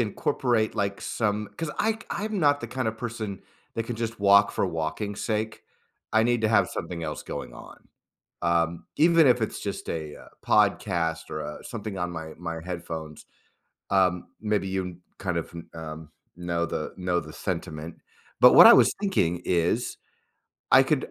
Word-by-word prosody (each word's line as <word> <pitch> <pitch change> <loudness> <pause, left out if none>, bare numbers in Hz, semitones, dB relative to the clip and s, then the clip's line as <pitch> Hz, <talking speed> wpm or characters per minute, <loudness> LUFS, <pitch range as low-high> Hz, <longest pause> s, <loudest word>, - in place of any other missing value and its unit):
incorporate, 115 +1 0
like, 100 0 -1
some 105 -2 -1
'cause 165 -2 -3
I 220 - +2
k 220 - -14
I'm 215 0 -2
not 145 -3 +3
the 115 - -5
kind 125 0 -2
of 110 0 -5
person 110 -5 -5 0.3
that 115 - -2
can 120 - -4
just 115 -1 -4
walk 100 0 +6
for - - 0
walking's 90 +5 -3
sake. 110 0 -2 0.5
I 110 - +4
need 120 0 +2
to 110 - +3
have 105 -2 +4
something 85 -2 -5
else 75 -1 -4
going - - -6
on, - - -13 0.5
um, 85 -1 +1
even 165 0 +6
if 125 -1 +4
it's 110 - -2
just 100 - -5
a, 80 -2 -4
uh, - - -14 0.2
podcast 80 -4 +1
or, 75 - -4
uh, 75 - -7
something 105 -4 -6
on 90 -1 -2
my 80 -2 -6
my 85 -1 -5
headphones, 80 -3 -6 0.6
um, 90 -2 +2
maybe 105 -2 0
you 95 0 -1
kn 90 -1 -8 0.2
kind 90 -3 -2
of 85 - -3
n 85 0 -9
um, 80 -1 -8 0.3
know 85 -1 -1
the - - -4
know 90 -1 0
the 75 -1 -10
sentiment, 85 -3 -5 0.5
but - - +9
what - - +11
I - - +11
was - - +5
thinking 90 - +1
is, 90 +7 0 0.8
I - - +9
could - - 0
95 Hz, 180 wpm, -26 LUFS, 85-110 Hz, 0.8 s, what